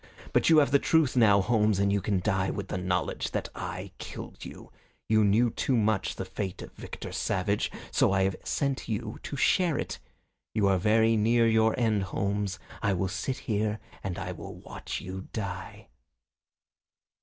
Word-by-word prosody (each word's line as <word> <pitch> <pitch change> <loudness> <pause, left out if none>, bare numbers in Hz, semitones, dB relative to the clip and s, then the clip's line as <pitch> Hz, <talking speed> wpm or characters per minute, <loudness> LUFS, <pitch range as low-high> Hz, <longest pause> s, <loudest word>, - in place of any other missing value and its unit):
But - - +4
you 160 - +7
have 145 -2 +5
the 140 - +5
truth 160 -5 +2
now, 105 -5 +6
Holmes, 105 -1 +2
and 100 0 +2
you 100 - +1
can 100 -2 0
die 95 -2 +1
with 100 -1 -4
the - - -2
knowledge 90 0 -1
that - - -2
I 90 +2 -6
killed - - -8
you. - - -10 0.4
You 110 0 +4
knew 110 +4 +3
too 130 +2 0
much 110 -2 +1
of - - -5
the 95 - -4
fate 95 0 -5
of - - -10
Victor - - -8
Savage, 100 +2 0 0.2
so - - +3
I 95 0 +3
have 95 0 +1
sent 140 -3 -1
you 110 0 -3
to - - -6
share 170 +2 +3
it. - - -4 0.6
You 105 -3 +3
are 95 -2 +3
very 110 +3 +4
near 115 +2 +3
your 110 0 +3
end, 110 -4 +2
Holmes. 100 0 -2 0.2
I 100 -3 +2
will 95 +1 -1
sit 95 +8 -3
here 105 -1 0 0.3
and 95 -1 -3
I 95 -2 -4
will 90 - -8
watch - - -6
you 95 +1 -7
die." 100 -4 -6
105 Hz, 185 wpm, -28 LUFS, 95-115 Hz, 0.6 s, you